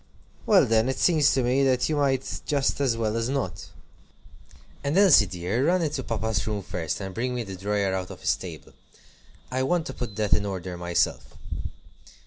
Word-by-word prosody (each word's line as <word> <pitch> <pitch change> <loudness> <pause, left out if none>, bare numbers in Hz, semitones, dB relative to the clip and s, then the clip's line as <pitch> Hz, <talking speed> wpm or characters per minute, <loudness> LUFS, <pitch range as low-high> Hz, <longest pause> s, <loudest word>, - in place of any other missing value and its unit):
"Well, - - +6
then 115 +2 +2
it 130 - -2
seems 155 -5 +4
to 130 - +1
me 130 +3 +2
that 130 -2 +2
you 155 - -1
might 135 -2 0
just 145 -1 0
as 125 -5 +1
well 110 -1 -1
as 115 +1 -1
not. 130 -11 -3 1.2
And 140 +5 0
Elsie, 185 - +7
dear, 95 - -1
run 180 0 +2
into 150 -3 -2
papa's 110 -3 -2
room 105 -2 -2
first, 90 -4 -3
and 95 -1 -6
bring 125 +3 -2
me 120 - -2
the 95 -3 -7
drawer 100 0 -1
out 95 -1 -3
of - - -10
his - - +2
table. - - -10 0.8
I 130 +1 0
want 165 +5 +1
to - - -5
put 120 -5 -6
that 105 -1 0
in 105 - +3
order 95 -3 -4
myself." 85 0 -1
115 Hz, 190 wpm, -26 LUFS, 100-135 Hz, 1.2 s, Elsie